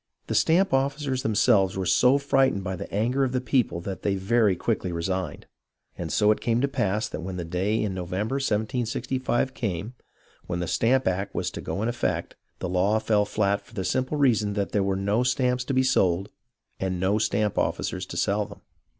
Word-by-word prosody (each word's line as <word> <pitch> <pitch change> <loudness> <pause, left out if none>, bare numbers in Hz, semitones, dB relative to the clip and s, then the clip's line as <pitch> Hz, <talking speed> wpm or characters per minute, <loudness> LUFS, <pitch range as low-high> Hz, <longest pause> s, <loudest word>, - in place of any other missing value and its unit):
The - - -3
stamp 180 +2 +3
officers 135 0 0
themselves 100 -4 +3
were 95 - -1
so 125 +9 +4
frightened 135 -7 +2
by 95 -1 -3
the - - -8
anger 120 +7 +1
of 130 -1 -1
the 130 - +1
people 125 -8 0
that 95 +2 -6
they 100 -1 0
very 100 +1 +2
quickly 95 -2 -1
resigned. 95 +2 -3 0.5
And - - -5
so 105 0 +4
it 110 - 0
came 115 0 +1
to 140 - +2
pass 105 -5 0
that - - -6
when 90 +1 -5
the 85 - -4
day 95 +6 0
in 105 -3 -1
November, 95 +8 -2
1765, 125 +2 -1
came, 105 0 -3 0.5
when 90 -1 -2
the 90 - -1
Stamp 130 +3 +2
Act 95 +2 -1
was - - -1
to - - -7
go 100 - -3
into 115 - 0
effect, 120 - -2 0.2
the - - -4
law 95 +4 +2
fell 110 -1 +2
flat 100 -1 0
for - - -19
the 95 - -2
simple 130 +9 0
reason 110 -7 +2
that 100 -1 -2
there 105 - +1
were 95 0 0
no 100 +4 +1
stamps 125 0 +1
to 135 - -2
be 130 - +4
sold 95 -6 +2 0.5
and 95 -1 -2
no 100 +4 +2
stamp 105 -1 0
officers - - -2
to - - -7
sell - - +1
them. - - -13
105 Hz, 200 wpm, -26 LUFS, 95-125 Hz, 0.5 s, so